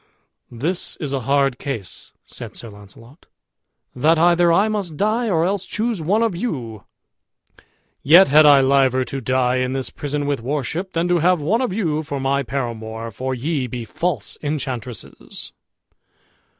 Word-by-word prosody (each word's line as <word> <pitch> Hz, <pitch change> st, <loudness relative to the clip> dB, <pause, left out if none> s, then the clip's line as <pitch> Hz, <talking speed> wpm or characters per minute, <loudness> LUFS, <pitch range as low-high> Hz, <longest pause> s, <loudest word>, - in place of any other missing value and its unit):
"This 155 Hz, +10 st, 0 dB
is 145 Hz, -4 st, -5 dB
a 135 Hz, -, 0 dB
hard 140 Hz, -2 st, +2 dB
case," 115 Hz, -10 st, -6 dB
said -, -, -10 dB
Sir 115 Hz, -, -9 dB
Launcelot, 105 Hz, -, -16 dB, 0.7 s
"that 155 Hz, +6 st, +3 dB
either 175 Hz, +1 st, +4 dB
I 195 Hz, +6 st, +4 dB
must 200 Hz, -8 st, -3 dB
die, 220 Hz, +3 st, 0 dB
or 165 Hz, -3 st, +2 dB
else 195 Hz, +1 st, -1 dB
choose 215 Hz, 0 st, -2 dB
one 205 Hz, +8 st, +1 dB
of 225 Hz, -6 st, 0 dB
you; 120 Hz, -, -5 dB, 1.2 s
yet 170 Hz, +7 st, +7 dB
had 150 Hz, +3 st, +6 dB
I 140 Hz, -2 st, +7 dB
liever 130 Hz, -1 st, +3 dB
to 135 Hz, +1 st, -5 dB
die 130 Hz, 0 st, +1 dB
in 130 Hz, 0 st, -1 dB
this 135 Hz, -1 st, -3 dB
prison 145 Hz, 0 st, -3 dB
with 140 Hz, -3 st, -1 dB
worship, 150 Hz, +8 st, -3 dB
than 170 Hz, +1 st, 0 dB
to 175 Hz, -1 st, +2 dB
have 180 Hz, +2 st, +3 dB
one 195 Hz, -, +1 dB
of 255 Hz, -, -1 dB
you 165 Hz, -7 st, -1 dB
for 145 Hz, -2 st, -5 dB
my 135 Hz, +1 st, 0 dB
paramour, 115 Hz, -3 st, -5 dB
for 130 Hz, +5 st, -4 dB
ye 135 Hz, +1 st, -2 dB
be 120 Hz, -1 st, -6 dB
false 140 Hz, -, -3 dB
enchantresses." 130 Hz, -, -5 dB
145 Hz, 160 wpm, -20 LUFS, 125-175 Hz, 1.2 s, yet